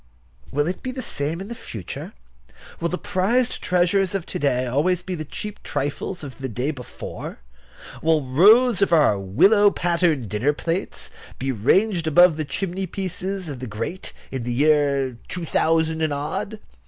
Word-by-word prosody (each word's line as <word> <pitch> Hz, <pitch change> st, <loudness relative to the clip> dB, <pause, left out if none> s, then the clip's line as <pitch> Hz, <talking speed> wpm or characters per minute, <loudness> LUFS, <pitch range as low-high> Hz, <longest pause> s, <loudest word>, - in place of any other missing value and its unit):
Will 145 Hz, +1 st, +1 dB
it 180 Hz, +3 st, -3 dB
be 255 Hz, -, -4 dB
the 255 Hz, 0 st, -5 dB
same 155 Hz, -5 st, -2 dB
in 195 Hz, -, -6 dB
the 235 Hz, -, -5 dB
future? 115 Hz, -, -7 dB, 0.7 s
Will 170 Hz, -, -1 dB
the 180 Hz, -, -2 dB
prized 235 Hz, +9 st, 0 dB
treasures 180 Hz, +2 st, +2 dB
of 185 Hz, -4 st, -2 dB
to -, -, -5 dB
day 130 Hz, -3 st, +1 dB
always 160 Hz, +8 st, +1 dB
be 185 Hz, -, -4 dB
the 155 Hz, -3 st, -4 dB
cheap 210 Hz, +7 st, -7 dB
trifles 145 Hz, +5 st, -3 dB
of 140 Hz, -2 st, -9 dB
the 135 Hz, -1 st, -4 dB
day 125 Hz, +6 st, -1 dB
before? 130 Hz, -5 st, -8 dB, 0.6 s
Will 160 Hz, -2 st, +2 dB
rows 210 Hz, -, +5 dB
of 200 Hz, -, +3 dB
our 150 Hz, -11 st, +4 dB
willow 200 Hz, -, +5 dB
pattern 170 Hz, -6 st, +1 dB
dinner 110 Hz, +8 st, 0 dB
plates 165 Hz, +5 st, -3 dB, 0.3 s
be 135 Hz, +1 st, -1 dB
ranged 170 Hz, -, +2 dB
above 175 Hz, +1 st, +6 dB
the 155 Hz, 0 st, -3 dB
chimneypieces 185 Hz, +3 st, -3 dB
of 140 Hz, -4 st, -6 dB
the 130 Hz, -, -5 dB
great 115 Hz, +12 st, -4 dB, 0.2 s
in 130 Hz, -, -3 dB
the 120 Hz, -, -3 dB
years 140 Hz, -2 st, +2 dB
2000 160 Hz, -2 st, +1 dB
and 155 Hz, -1 st, +1 dB
odd? 150 Hz, +9 st, -3 dB
160 Hz, 165 wpm, -23 LUFS, 135-190 Hz, 0.7 s, above